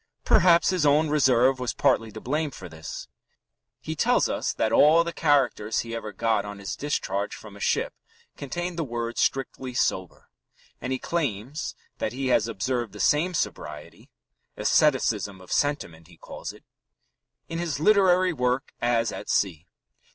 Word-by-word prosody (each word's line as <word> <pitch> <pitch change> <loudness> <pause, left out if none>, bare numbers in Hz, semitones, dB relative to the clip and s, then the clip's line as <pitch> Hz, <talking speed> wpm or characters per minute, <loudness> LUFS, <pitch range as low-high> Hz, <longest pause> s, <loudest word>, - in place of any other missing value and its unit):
Perhaps 170 -1 +5
his 180 -4 0
own 150 +2 +4
reserve 130 -3 +3
was 125 -1 -2
partly 120 -5 +2
to 110 - -8
blame 150 +6 -1
for 95 -8 -10
this. 80 -1 -8 0.7
He - - -5
tells - - +3
us - - -1
that 110 - -1
all 155 +7 +6
the 170 0 -5
"characters" 135 -9 +1
he 115 0 -6
ever 110 -2 -5
got 110 +1 0
on 105 0 -7
his 100 0 -5
discharge 100 -8 -2
from 105 -2 -12
a - - -12
ship - - 0 0.4
contained 175 +5 -4
the - - +1
words 120 -3 -3
"strictly 130 -1 -1
sober," 95 -6 -2 0.5
and 125 - -4
he 130 - 0
claims 140 -3 -3 0.2
that 110 - -2
he 130 0 -2
has 115 -3 +3
observed 115 0 -2
the 105 - -10
same 170 - +2
sobriety 75 - -5 0.5
"asceticism 110 -9 +2
of 95 - -14
sentiment," 85 - -1
he 85 -2 -18
calls - - -8
it - - -17 0.8
in 165 - -4
his 165 -4 -2
literary 185 -1 +4
work 125 -1 -1
as 115 -2 +1
at - - -7
sea. 90 -4 0
125 Hz, 160 wpm, -26 LUFS, 105-150 Hz, 0.8 s, all